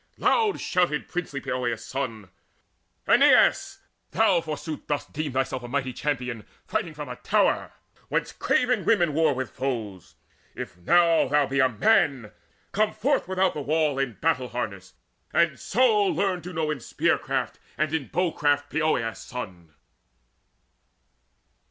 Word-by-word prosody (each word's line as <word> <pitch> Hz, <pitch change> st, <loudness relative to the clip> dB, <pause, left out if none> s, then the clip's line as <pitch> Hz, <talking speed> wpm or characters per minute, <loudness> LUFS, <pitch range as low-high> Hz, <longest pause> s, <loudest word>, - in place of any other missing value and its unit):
Loud 440 Hz, -4 st, +2 dB
shouted 175 Hz, -5 st, 0 dB
princely 165 Hz, -5 st, -4 dB
Poeas' 125 Hz, -4 st, -3 dB
son: 115 Hz, -8 st, -5 dB, 0.8 s
"Aeneas, -, -, +4 dB, 0.3 s
thou, 170 Hz, -, +3 dB
forsooth, 155 Hz, -1 st, -6 dB
dost 145 Hz, -1 st, -3 dB
deem 155 Hz, -1 st, -3 dB
thyself 130 Hz, -1 st, -1 dB
A 120 Hz, -, -8 dB
mighty 130 Hz, 0 st, -2 dB
champion, 125 Hz, -5 st, -3 dB, 0.2 s
fighting 165 Hz, -3 st, -3 dB
from 150 Hz, -1 st, -6 dB
a -, -, -7 dB
tower -, -, +1 dB, 0.4 s
Whence -, -, -1 dB
craven 250 Hz, -7 st, +1 dB
women 175 Hz, -9 st, +2 dB
war 155 Hz, -2 st, +2 dB
with 130 Hz, 0 st, -4 dB
foes! 115 Hz, -9 st, -5 dB, 0.4 s
Now -, -, -5 dB
if -, -, -13 dB
Thou 150 Hz, -, +3 dB
be 135 Hz, +1 st, -1 dB
a 130 Hz, -1 st, +5 dB
man, 130 Hz, -, +2 dB, 0.4 s
come 215 Hz, +1 st, +1 dB
forth 275 Hz, -4 st, 0 dB
without 190 Hz, 0 st, +1 dB
the 150 Hz, -, -4 dB
wall 150 Hz, -1 st, +1 dB
In 135 Hz, -4 st, -1 dB
battle 140 Hz, -2 st, 0 dB
harness, 100 Hz, -6 st, -5 dB, 0.4 s
and -, -, +2 dB
so 225 Hz, -2 st, +3 dB
learn 185 Hz, +1 st, 0 dB
to 180 Hz, -, -8 dB
know 160 Hz, -3 st, -1 dB
In 150 Hz, -, -3 dB
spear -, -, 0 dB
craft -, -, -3 dB, 0.2 s
and 155 Hz, +1 st, 0 dB
in 160 Hz, -5 st, -1 dB
bow 180 Hz, -1 st, 0 dB
craft 145 Hz, -1 st, 0 dB
Poeas' 155 Hz, -8 st, 0 dB
son!" 90 Hz, -10 st, -8 dB
145 Hz, 145 wpm, -25 LUFS, 125-170 Hz, 0.8 s, a